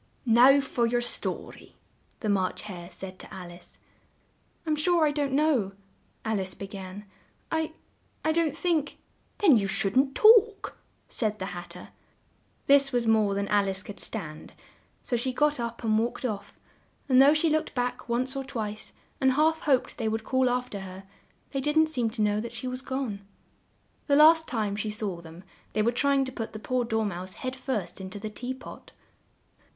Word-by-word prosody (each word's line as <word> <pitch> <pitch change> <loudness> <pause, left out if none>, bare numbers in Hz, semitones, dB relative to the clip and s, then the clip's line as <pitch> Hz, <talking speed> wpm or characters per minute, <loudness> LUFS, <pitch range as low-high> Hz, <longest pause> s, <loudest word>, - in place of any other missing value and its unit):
"Now, 250 +4 +7
for 240 -3 0
your 240 +1 +1
sto 240 - -2
ry," - - -16 0.5
the 220 - -2
March 190 -2 0
Hare 175 -4 -8
said 185 +1 -9
to - - -11
Al 180 -2 -8
ice. 175 - -13 0.9
"I'm 310 -1 +1
sure 330 +1 +3
I 295 - +2
don't 285 -2 -1
know," 270 -9 +2 0.5
Alice 195 -4 -2
be 200 - -6
gan, 195 +1 -8 0.5
"I 320 -1 -1 0.5
I 315 - +3
don't 315 -2 +1
think 330 -5 0 0.2
" - - -40
"Then 330 - +6
you 200 -2 0
shouldn't 220 +7 +1
talk," 440 -2 +5 0.3
said 215 -3 -1
the 190 -2 -5
Hat 175 0 -7
ter. - - -11 0.8
This 275 0 +5
was 245 -2 +1
more 215 -3 +3
than 200 0 -1
Al 205 -1 +3
ice 190 0 -4
could 205 - -9
stand; 165 -8 -6 0.5
so 245 - -1
she 240 +2 0
got 295 +3 +1
up 235 0 -4
and 220 -1 +3
walked 235 +3 -2
off, 205 -4 -4 0.5
and 260 -1 +6
though 285 +3 +7
she 310 +1 +2
looked 310 -1 -1
back 245 -1 -2
once 255 +3 -1
or 270 - -2
twice 220 -6 -5 0.3
and 265 -1 +3
half 315 +3 +3
hoped 265 -4 +1
they 225 - -1
would 220 0 -2
call 260 +2 +2
af 250 0 -1
ter 200 - -5
her, 190 0 -9 0.5
they 275 - -2
didn't 315 +3 +3
seem 245 -7 0
to 220 -1 -2
know 210 0 +1
that 235 - -6
she 255 - -5
was 255 +1 -3
gone. 260 -7 -3 0.9
The 285 - +4
last 320 +2 +7
time 215 -5 -1
she 215 +1 -3
saw 205 -5 -4
them, 165 +2 -12 0.3
they 215 - +1
were 235 - +3
trying 275 +2 +2
to 260 - -6
put 225 -3 -5
the - - -5
poor 245 +3 -1
Dor 220 -1 0
mouse 185 -1 -5
head 255 0 -4
first 215 -10 -4
in 190 - -6
to 190 - -7
the 215 +1 -6
tea 250 +4 -5
pot. 260 - -12
235 Hz, 195 wpm, -27 LUFS, 205-275 Hz, 0.9 s, Now